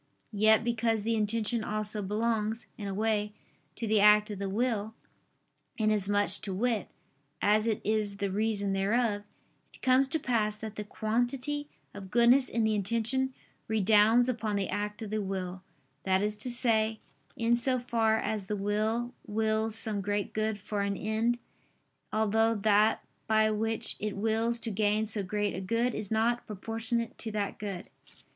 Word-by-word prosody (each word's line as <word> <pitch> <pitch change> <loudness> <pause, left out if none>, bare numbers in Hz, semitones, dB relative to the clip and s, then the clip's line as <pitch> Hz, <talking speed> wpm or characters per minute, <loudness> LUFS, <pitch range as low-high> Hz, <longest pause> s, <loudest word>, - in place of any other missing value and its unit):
Yet 215 +2 +4
because 230 -2 0
the 230 +1 0
intention 220 +1 0
also 215 0 -3
belongs, 220 +2 -1
in 205 - -6
a - - -3
way, 210 -1 0 0.4
to 230 - -4
the 215 -1 +3
act 210 +1 +6
of 200 - -6
the 200 -1 -2
will, 220 0 -1 0.8
inasmuch, 205 -2 +1
to 200 - -5
wit, 225 -1 0 0.5
as 215 +2 +3
it 220 -2 +1
is 210 -2 0
the 200 -1 -2
reason 205 -1 0
thereof; 205 +2 +1 0.5
it - - -19
comes 260 +1 +4
to 280 - -1
pass 215 -6 0
that 220 -1 -7
the 210 - -4
quantity 245 +7 -2 0.2
of 200 -2 -9
goodness 245 +4 +5
in 230 - 0
the 220 0 +2
intention 230 +6 0 0.3
redounds 220 +3 +4
upon 225 -4 -1
the 200 -1 -1
act 210 +1 -3
of 210 - -6
the 215 0 0
will; 190 -2 -4 0.4
that 190 +2 +1
is 210 0 0
to 215 +4 -3
say, 225 -3 +2 0.4
in 230 +1 +3
so 255 +2 +1
far 230 -3 +1
as 210 -3 -2
the 210 - -2
will 215 +4 -1
wills 220 0 0
some 215 -3 -2
great 205 +1 -2
good 215 -1 0
for 205 +1 -3
an 200 -1 -1
end, 220 +3 0 0.7
although 220 +1 +2
that 210 +1 +3 0.2
by 220 0 +3
which 225 +1 -1
it 210 -1 -3
wills 225 +3 +1
to 225 - -3
gain 210 +1 +1
so 210 -1 0
great 205 +2 -1
a 185 - -4
good, 230 +5 0
is 205 - -4
not 230 +2 +1
proportionate 225 +2 -3
to 225 - -3
that 205 -1 -3
good. 200 -4 -5
215 Hz, 165 wpm, -30 LUFS, 205-230 Hz, 0.8 s, act